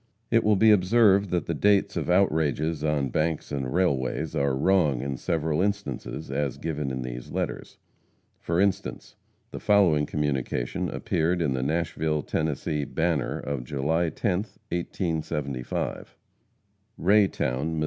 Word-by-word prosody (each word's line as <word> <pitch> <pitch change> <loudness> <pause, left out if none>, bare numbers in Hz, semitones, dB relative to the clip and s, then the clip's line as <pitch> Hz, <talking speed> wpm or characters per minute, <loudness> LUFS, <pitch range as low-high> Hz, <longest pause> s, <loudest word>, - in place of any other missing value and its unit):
It 115 0 +4
will 105 0 +4
be 110 +2 +6
observed 100 0 +4
that 85 -3 0
the - - -2
dates 100 -1 +2
of - - -2
outrages 80 -4 +1
on 75 -3 0
banks 80 +2 -1
and 65 -3 -2
railways, 75 -4 0
are 70 -1 +1
wrong 75 -6 +2
in 70 0 -3
several 80 +3 -1
instances, 100 -9 -3
as 70 -2 -1
given 75 -3 -3
in 65 -1 -3
these 60 0 -6
letters. - - -4 0.6
For 85 +1 -1
instance: 100 0 -1 0.4
The - - -6
following 85 -8 +3
communication 70 -5 -2
appeared 85 +3 0
in 75 -5 +1
the 65 - -1
Nashville 80 0 -1
(Tenn.) 80 - -1 0.5
Banner, 80 -5 0
of 70 -4 -4
July 75 +6 0
10th, 100 +2 -2
1875: 80 -7 -3 0.8
RAY 100 +2 +4
TOWN, 75 +2 -2
MO. - - -1
80 Hz, 140 wpm, -26 LUFS, 70-95 Hz, 0.8 s, be